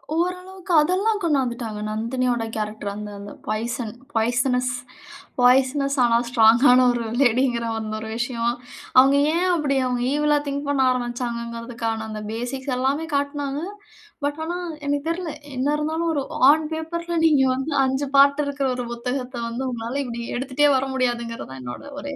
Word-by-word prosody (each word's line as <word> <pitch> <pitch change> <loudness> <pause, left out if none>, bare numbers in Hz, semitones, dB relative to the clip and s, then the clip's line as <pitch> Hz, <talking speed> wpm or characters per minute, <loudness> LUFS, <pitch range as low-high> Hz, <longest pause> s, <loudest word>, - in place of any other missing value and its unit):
ஓரளவுக்கு 365 +2 -3
அதெல்லாம் 390 +7 +1
கொண்டு 315 -4 +2
வந்துட்டாங்க. 235 -3 -4
நந்தினியோட 240 +2 -1
கேரக்டர் 215 -1 -3
அந்த 210 0 -6 0.4
பாய்சன், 225 +1 -2 0.2
பாய்சனஸ் 250 +2 +1 0.7
பாய்சனஸ் 265 +3 +3
ஆனா 235 -1 +4
ஸ்ட்ராங் 230 0 +5
ஆன 255 0 +6
ஒரு 240 -1 -2 0.2
லேடிங்கிற 245 -2 +2 0.3
ஒரு 220 0 -6
விஷயம். 235 -1 -1 0.5
அவுங்க 270 +2 +6 0.2
ஏன் 350 +2 +1
அப்பிடி 285 -4 0
அவுங்க 245 -1 -1
ஈவில்லா 295 0 +3
திங்க் 280 +1 -3
பண்ண 275 -2 +2
ஆரம்பிச்சாங்கறதுக்கான 235 -2 -3
அந்த 215 -1 -5
பேசிக்ஸ் 255 +4 -3
எல்லாமே 275 +5 0
காட்டினாங்க. 285 0 -2 0.6
பட் 290 +2 -2
ஆனா 345 +2 -3 0.3
எனக்குத் 285 +2 -1
தெரியல. 335 -1 -2 0.3
என்ன 260 +2 0
இருந்தாலும் 320 +2 -1
ஒரு 285 -3 -1 0.3
ஆன் 310 +1 +1
பேப்பர்ஸ்ல 335 +2 -3
நீங்க 295 -4 +5
வந்து 270 +4 -3
5 265 +2 -1
பாட்டு 280 +1 +6
இருக்கற 280 -1 -1
ஒரு 250 - -3
புத்தகத்த 250 +2 -4
வந்து 235 +3 -4
உங்களால 240 +3 -3
இப்பிடி 235 -2 -5 0.2
எடுத்துட்டே 270 +3 +2
வர 260 - 0
முடியாதுங்கிறது 235 - -2
தான் 130 0 -8
என்னோட 120 0 -7 0.2
ஒரே 285 0 -6
260 Hz, 145 wpm, -23 LUFS, 235-290 Hz, 0.7 s, ஆன